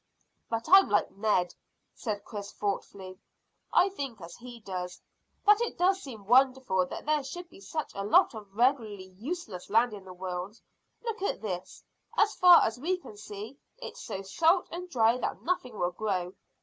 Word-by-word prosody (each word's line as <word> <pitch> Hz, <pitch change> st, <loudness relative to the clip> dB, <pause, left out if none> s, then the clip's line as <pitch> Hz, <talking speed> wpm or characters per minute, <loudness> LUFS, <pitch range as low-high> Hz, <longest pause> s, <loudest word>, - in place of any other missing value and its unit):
"But 230 Hz, 0 st, -2 dB
I'm 385 Hz, +3 st, +8 dB
like -, -, +2 dB
Ned," 200 Hz, -4 st, +1 dB, 0.4 s
said 210 Hz, -3 st, -4 dB
Chris 200 Hz, -2 st, -7 dB
thoughtfully; 195 Hz, -2 st, -4 dB, 0.5 s
"I 375 Hz, -, +5 dB
think 275 Hz, -, -6 dB
as 170 Hz, -1 st, -10 dB
he 245 Hz, -1 st, -11 dB
does, 180 Hz, -4 st, -5 dB, 0.5 s
that 415 Hz, +2 st, +6 dB
it 475 Hz, -, -2 dB
does 380 Hz, +2 st, +3 dB
seem 225 Hz, -, -9 dB
wonderful 255 Hz, -5 st, +3 dB
that -, -, -7 dB
there 300 Hz, -1 st, +1 dB
should 350 Hz, +6 st, -7 dB
be -, -, -14 dB
such 305 Hz, +11 st, -4 dB
a 200 Hz, -, -4 dB
lot 205 Hz, -, +5 dB
of 210 Hz, -3 st, -10 dB
regularly 220 Hz, -6 st, +1 dB
useless 220 Hz, -, -6 dB
land 225 Hz, +2 st, +3 dB
in 200 Hz, -2 st, -8 dB
the 185 Hz, -, -10 dB
world. 185 Hz, +3 st, -5 dB, 0.4 s
Look 460 Hz, -3 st, -4 dB
at 400 Hz, -, -2 dB
this: 185 Hz, -4 st, -5 dB, 0.3 s
as 420 Hz, 0 st, +4 dB
far 355 Hz, -1 st, +8 dB
as 225 Hz, +2 st, -1 dB
we 360 Hz, +7 st, 0 dB
can 280 Hz, -11 st, -12 dB
see 210 Hz, +5 st, -9 dB, 0.2 s
it's -, -, -8 dB
so 195 Hz, -, -5 dB
salt 330 Hz, -, +2 dB
and 360 Hz, +1 st, -6 dB
dry 235 Hz, -3 st, +3 dB
that -, -, -3 dB
nothing 255 Hz, -, -2 dB
will 175 Hz, 0 st, 0 dB
grow. 185 Hz, -3 st, -2 dB
225 Hz, 175 wpm, -29 LUFS, 195-310 Hz, 0.5 s, I'm